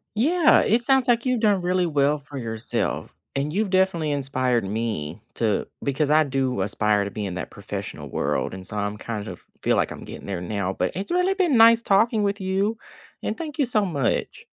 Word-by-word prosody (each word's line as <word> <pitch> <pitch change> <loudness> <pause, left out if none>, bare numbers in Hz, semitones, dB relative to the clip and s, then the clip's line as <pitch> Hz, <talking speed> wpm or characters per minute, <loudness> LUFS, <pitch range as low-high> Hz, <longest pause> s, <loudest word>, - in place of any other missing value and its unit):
Yeah, 315 +8 +4
it 230 +3 +2
sounds 265 0 +3
like 240 0 +2
you've 255 -2 +1
done 205 -4 +3
really 180 +1 +1
well 145 -2 +2
for 145 0 -10
yourself, 115 -2 -3 0.2
and 145 +3 -1
you've 210 +1 0
definitely 185 -5 +2
inspired 130 -4 0
me 105 -5 -3
to 110 -3 0 0.2
because 140 +1 0
I 155 +1 +5
do 130 -6 -1
aspire 105 +1 +1
to 100 - -5
be 105 +1 -4
in 95 -2 -4
that 90 - -5
professional - - -7
world, - - -1
and 95 -1 -8
so 105 - -7
I'm 105 0 -2
kind 105 -1 -5
of - - -9 0.2
feel - - +2
like - - +1
I'm - - -8
getting - - -9
there 95 -3 -4
now, 95 0 -2
but 90 - -1
it's 195 - -4
really 360 +2 +2
been 345 -10 +2
nice 230 +1 +7
talking 215 +2 +3
with 200 0 -1
you, 195 +4 0 0.4
and - - -3
thank 315 -2 -6
you 280 - +4
so 215 -4 +2
much. 145 -9 -2
150 Hz, 205 wpm, -24 LUFS, -, 0.4 s, nice